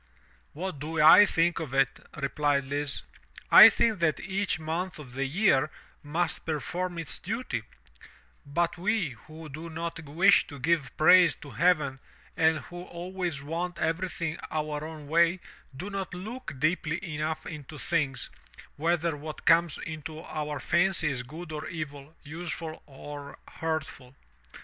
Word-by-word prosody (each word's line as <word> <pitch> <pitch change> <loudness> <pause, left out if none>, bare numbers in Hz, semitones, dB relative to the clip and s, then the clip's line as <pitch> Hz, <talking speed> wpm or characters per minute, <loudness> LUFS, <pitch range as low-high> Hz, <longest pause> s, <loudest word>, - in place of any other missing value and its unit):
"What 175 -1 -5
do 155 +2 -4
I 170 +7 +9
think 170 0 +2
of 145 -5 -5
it?" 135 -1 +2 0.2
replied 140 0 +1
Lise, 145 0 -1 0.5
"I - - +12
think 230 -4 +1
that 160 -2 +2
each 195 -2 -1
month 165 +4 -3
of 135 -5 -11
the 135 +1 -1
year 155 -3 +3 0.3
must 160 +3 -1
perform 175 +3 -3
its 160 -8 -3
duty, 210 - -3 0.8
but 170 +4 -1
we 200 -3 +1 0.2
who 155 +1 -10
do 155 +3 -8
not 165 0 -5
wish 170 +7 +4
to 145 - -9
give 155 -1 0
praise 175 +2 +7
to 145 - -12
heaven 150 -5 +2 0.4
and 160 -2 +3
who 175 0 -9
always 175 -4 -4
want 170 +4 -3
everything 165 -1 -2
our 150 -1 -2
own 155 -2 -8
way 170 +3 +3 0.4
do 190 +7 -6
not 195 -2 -4
look 220 - -7
deeply 155 +2 0 0.2
enough 155 +1 -3
into 150 -1 -8
things, 140 -3 -1 0.5
whether 165 +1 +1
what 150 +1 -8
comes 165 -2 +4
into 155 0 -7
our 150 -3 -4
fancy 170 -2 +2
is 130 -3 -2
good 155 +6 -9
or 150 -1 -5
evil, 150 -1 -7
useful 160 +1 -6
or 145 +1 -9
hurtful. 140 -5 -4
160 Hz, 145 wpm, -28 LUFS, 145-175 Hz, 0.8 s, I